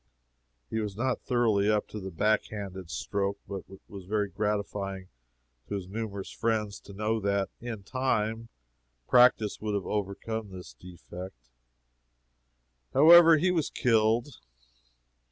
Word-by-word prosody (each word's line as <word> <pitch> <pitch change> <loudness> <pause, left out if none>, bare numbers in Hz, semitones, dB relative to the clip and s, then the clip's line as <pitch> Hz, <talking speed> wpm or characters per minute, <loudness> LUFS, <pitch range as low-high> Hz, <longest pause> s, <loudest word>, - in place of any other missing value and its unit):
He 110 - -1
was 105 -2 -4
not 130 +2 -1
thoroughly 110 -5 +2
up 105 -1 0
in 105 -2 -6
the 95 - -4
backhanded 100 -1 -2
stroke, 100 +3 -2
but 100 -2 -6
it 95 0 -13
was 100 -3 -10
very 105 +1 -1
gratifying 100 -1 -3 0.6
to - - -3
his 95 -2 -5
numerous 100 -1 -5
friends 110 -3 -1
to 100 - -13
know 110 +2 -1
that, 100 -1 0
in 115 -4 -6
time, 115 -2 -1 0.6
practice 125 -4 +4
would 105 -1 -2
have 100 -3 -2
overcome 105 +2 -3
this 90 -9 -10
defect. 85 -4 -11 1.4
However, 165 +3 +9
he 180 +4 +2
was 165 -5 0
killed. 115 +2 +1
105 Hz, 130 wpm, -28 LUFS, 95-115 Hz, 1.4 s, However